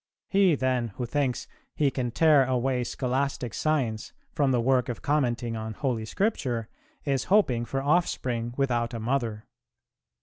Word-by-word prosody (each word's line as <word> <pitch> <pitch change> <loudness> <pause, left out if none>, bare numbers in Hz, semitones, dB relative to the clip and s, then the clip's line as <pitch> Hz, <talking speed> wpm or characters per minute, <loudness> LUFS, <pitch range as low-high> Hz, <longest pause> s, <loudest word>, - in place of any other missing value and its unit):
He, 195 -4 +4
then, 130 -3 0
who 125 - -2
thinks 130 0 -1 0.3
he 145 -3 +2
can 125 -2 -2
tear 145 +3 +5
away 125 0 0
Scholastic 130 -1 -2
Science 130 -9 -1 0.2
from 145 -2 +2
the 125 -2 +2
work 125 +1 +2
of 120 - -5
commenting 120 -5 0
on 110 -1 -5
Holy 120 -4 -1
Scripture 120 - -1 0.4
is 135 -3 0
hoping 130 - +3
for 135 +3 -3
offspring 125 -7 0
without 120 -3 0
a - - -3
mother." 115 -2 -2
125 Hz, 145 wpm, -27 LUFS, 120-140 Hz, 0.4 s, tear